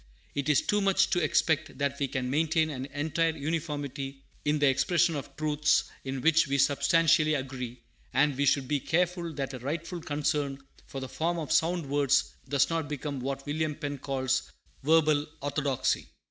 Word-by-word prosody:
It 140 0 -2
is 150 - +4
too 210 0 +1
much 195 -1 +3
to 175 -3 +2
expect 155 0 +1
that 140 0 -1
we 140 - +1
can 130 -1 -3
maintain 160 +1 +2
an 130 -1 -5
entire 160 +3 -1
uniformity 145 -3 -4 0.2
in 150 +1 +2
the 145 - +2
expression 155 +5 +3
of 140 -1 -6
truths 150 0 +2 0.2
in 135 -1 -4
which 165 +1 +4
we 140 0 0
substantially 155 +3 +3
agree; 125 -3 -5 0.3
and 145 0 +3
we 140 +2 +1
should 135 -1 +2
be 145 0 +1
careful 175 +3 0
that 135 -1 -4
a 130 - -6
rightful 165 +6 -4
concern 145 -2 -1 0.3
for 135 - -6
"the 130 - -4
form 170 +5 -1
of 155 -5 -4
sound 170 0 +2
words" 140 -1 +2 0.2
does 140 -1 +3
not 165 -3 -2
become 145 -1 -4
what 135 +1 -4
William 150 +1 -1
Penn 145 -2 -5
calls 135 -1 -1 0.3
"verbal 155 0 +3
orthodoxy." 145 -2 -1
145 Hz, 175 wpm, -29 LUFS, 135-160 Hz, 0.3 s, is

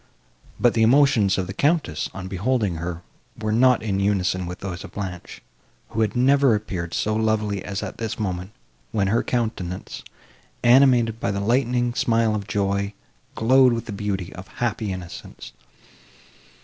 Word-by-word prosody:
But 120 - +4
the 115 - +1
emotions 115 -5 +4
of 95 - -1
the 95 - -6
Countess, 145 - 0
on 95 -1 -7
beholding 100 -1 0
her, 85 +1 -5 0.3
were 110 -1 -2
not 125 +2 +4
in 100 -3 -1
unison 95 -2 0
with 90 0 -7
those 95 -2 -5
of 100 - -11
Blanche, 95 -4 -7 0.5
who 110 - -2
had 110 +1 0
never 135 -1 +4
appeared 90 -5 -4
so 110 0 0
lovely 110 -3 0
as 100 0 -4
at - - -7
this 110 -1 -3
moment, 95 -3 -3 0.4
when 100 -3 +1
her 115 +3 +2
countenance, 110 -7 -3 0.6
animated 120 -3 +5
by - - -1
the 100 0 -1
lightning 120 +2 +1
smile 115 -3 +2
of 105 -1 -3
joy, 100 +1 -1 0.4
glowed 130 +2 +5
with 115 - -3
the - - -6
beauty 100 -3 -3
of 95 +1 -10
happy 110 -3 -2
innocence. 90 -9 -8
105 Hz, 160 wpm, -23 LUFS, 95-120 Hz, 0.6 s, animated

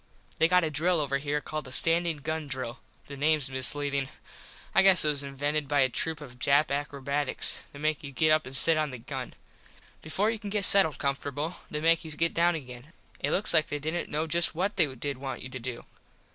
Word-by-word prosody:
They 160 - +5
got 180 +1 +3
a 160 - -2
drill 165 +4 +1
over 140 -2 -1
here 145 +1 -2
called 155 0 -5
the 130 - -9
standin 165 +3 +6
gun 155 0 -4
drill. 130 -1 -5 0.3
The 140 - -9
names 145 -1 0
misleadin. 140 +1 +3 0.6
I - - +5
guess 190 -4 +6
it - - +3
was 145 -2 +2
invented 145 +2 -3
by 145 0 +2
a 130 - +3
troop 160 +4 -3
of 125 -4 -12
Jap 140 +3 +2
akrobats. 140 0 -2
They - - -13
make 155 +1 -2
you 140 - -7
get 155 +4 +2
up 155 -2 +2
and 130 +1 +3
sit 165 +4 +5
on 155 -1 0
the 130 - -8
gun. 115 - -7 0.7
Before 190 +8 -1
you 225 - -5
can 205 -2 -7
get 200 -1 +1
settled 160 -8 +4
comfortable 145 +4 -4
they 150 - -4
make 165 0 +2
you 160 - -9
get 165 +2 -1
down 170 +1 +2
again. 130 +1 -10 0.3
It - - -1
looks 210 +3 0
like 155 -2 +4
they 150 - -3
didnt 160 +4 -3
know 155 +2 -2
just 170 +1 0
what 195 +5 -2
they 160 -5 +3
did 140 +2 -5
want 135 -1 -6
you 130 - -8
to 130 - -8
do. 120 0 -7
150 Hz, 225 wpm, -27 LUFS, 140-165 Hz, 0.7 s, standin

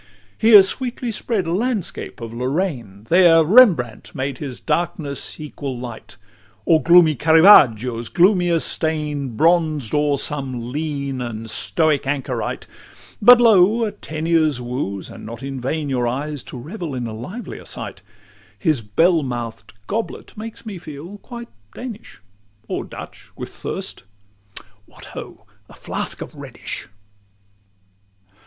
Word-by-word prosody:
LXXII 225 - +3
Here 205 -3 +11
sweetly 245 +4 -2
spread 215 -3 -2
a 165 - -2
landscape 215 - -2
of 115 -1 -6
Lorraine; 125 - -3
There 170 -2 +6
Rembrandt 170 - +4
made 130 -1 -3
his 135 -4 -6
darkness 165 -5 -3
equal 140 -3 -6
light, 120 -5 -9 0.5
Or 160 -2 +4
gloomy 170 -2 +6
Caravaggio's 130 - +5
gloomier 175 -2 +3
stain 150 -7 -1
Bronzed 155 -6 +2
o'er 145 -1 +2
some 130 -5 -3
lean 140 -3 -3
and 115 -2 -5
stoic 155 -1 0
anchorite: 135 -2 -3 0.6
But, 245 +3 +9
lo! 225 0 +5
a 210 - -2
Teniers 160 -6 0
woos, 120 -6 -4
and - - -11
not 115 +2 -8
in 135 -1 -5
vain, 145 +4 -2
Your 125 -3 0
eyes 145 +3 -3
to - - -8
revel 160 - -6
in 125 -1 -3
a 115 - -5
livelier 180 - -8
sight: - - -6 0.6
His 155 - +1
bell 165 - +2
mouth'd 115 -4 -5
goblet 225 - -4
makes 225 +1 -8
me 200 -5 -6
feel 165 +6 -9
quite 235 0 -9 0.3
Danish 235 -3 -9 0.5
Or - - -3
Dutch - - -11
with - - -7
thirst - - -6 0.8
What, - - -14
ho! - - -9 0.2
a - - -14
flask - - -4
of - - -12
Rhenish. - - -8
150 Hz, 135 wpm, -21 LUFS, 125-180 Hz, 0.8 s, Here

